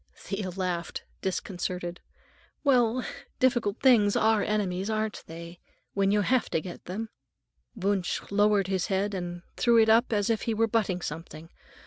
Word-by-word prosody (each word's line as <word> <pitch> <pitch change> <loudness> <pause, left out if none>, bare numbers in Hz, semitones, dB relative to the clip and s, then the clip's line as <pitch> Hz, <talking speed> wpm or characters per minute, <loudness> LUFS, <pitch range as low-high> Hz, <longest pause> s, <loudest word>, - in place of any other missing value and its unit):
Thea 195 -1 -4
laughed, 180 -2 -3 0.2
disconcerted. 180 -2 -3 0.6
"Well, 250 -3 +3 0.3
difficult 240 -5 +1
things 225 -6 +5
are 220 -1 +3
enemies, 195 -2 -1
aren't 215 -1 -2
they? 170 +1 -9 0.3
When 195 0 +2
you 205 +1 +3
have 250 +4 +1
to - - +1
get 175 +2 -9
them?" 215 +5 -4 0.7
Wunsch 195 -3 0
lowered 205 -1 +3
his 190 -1 -1
head 200 0 0
and 175 -1 -5
threw 235 -1 +4
it 220 -1 +5
up 230 +3 +4
as 205 0 +2
if 220 - 0
he 225 - -1
were 225 +1 +3
butting 205 -5 0
something. 165 +1 -7
200 Hz, 150 wpm, -28 LUFS, 180-220 Hz, 0.7 s, things